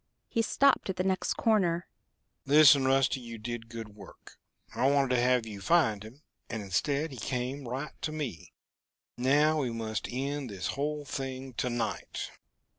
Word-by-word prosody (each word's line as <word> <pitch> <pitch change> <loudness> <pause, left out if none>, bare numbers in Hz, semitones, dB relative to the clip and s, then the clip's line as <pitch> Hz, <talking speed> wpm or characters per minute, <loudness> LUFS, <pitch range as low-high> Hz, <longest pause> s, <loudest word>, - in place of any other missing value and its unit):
He 230 - 0
stopped 275 -1 +3
at 190 - -1
the 185 - -1
next 190 0 0
corner. 180 -6 +2 0.6
"Listen, 140 -2 +7
Rusty. 135 0 +3
You 115 -2 -8
did 115 +1 -6
good 115 -2 -7
work. 105 -2 -15 0.3
I 135 - +2
wanted 140 -2 +2
to 120 - +3
have 125 -1 +3
you 105 -3 -8
find 110 -9 +3
him, 120 +8 -12 0.3
and 110 -2 -4
instead 140 - 0
he 130 - -8
came 125 +3 -3
right 130 +5 -4
to 155 - -2
me. 140 - -5 0.6
Now, 145 +5 +3
we 130 -4 0
must 110 -1 -3
end 135 +1 -3
this 95 -3 -4
whole 150 +1 -2
thing 135 -1 -5
to 125 - -1
night." 120 -1 -3
130 Hz, 165 wpm, -30 LUFS, 115-150 Hz, 0.6 s, Listen